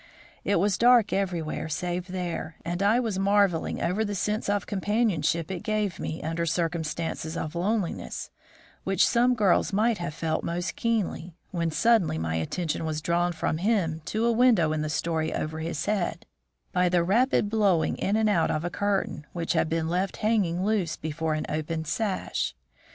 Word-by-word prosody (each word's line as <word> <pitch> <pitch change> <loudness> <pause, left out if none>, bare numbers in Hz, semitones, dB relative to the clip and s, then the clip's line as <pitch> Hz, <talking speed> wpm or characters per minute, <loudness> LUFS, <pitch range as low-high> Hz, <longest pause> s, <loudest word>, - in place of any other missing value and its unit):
It 200 - +1
was 195 0 +1
dark 240 -3 +5
everywhere 175 -5 -2
save 175 +3 -2
there, 175 -3 -4
and 175 +2 -2
I 210 +4 +4
was 220 -6 -1
marveling 200 -3 +2
over 180 +6 +1
the 205 -1 -3
sense 210 +3 -1
of 205 0 0
companionship 190 -6 0
it 180 -2 -4
gave 210 -4 -1
me 160 - -4
under 165 +2 -1
circumstances 165 -1 -2
of 155 - -4
loneliness, 190 +1 -2 0.5
which - - +3
some 245 +1 +3
girls 205 -4 +3
might 215 +2 +2
have 170 -3 -4
felt 160 -1 -1
most 175 +2 -2
keenly, 200 -7 -1 0.2
when 170 -2 0
suddenly 220 - +3
my 80 0 -2
attention 150 - -2
was 155 -1 -2
drawn 175 +2 +1
from 160 -1 -2
him 175 -6 +1
to 220 +2 -1
a 235 - +4
window 225 -10 +4
in 155 - -1
the 155 - -2
story 160 0 -1
over 155 +1 -3
his 160 -1 -3
head, 205 -4 -1 0.5
by 180 0 +2
the 175 -1 +3
rapid 230 +5 +3
blowing 205 -6 +2
in 200 - 0
and 220 0 +3
out 185 -6 +2
of 155 +2 -1
a 175 - -2
curtain, 195 -7 -1
which 170 -1 -1
had 160 - +1
been 165 -1 0
left 180 +3 -1
hanging 195 -5 +1
loose 205 -6 0
before 160 0 -2
an 155 - -2
open 160 +1 -3
sash. 170 - -2
175 Hz, 175 wpm, -27 LUFS, 160-205 Hz, 0.5 s, dark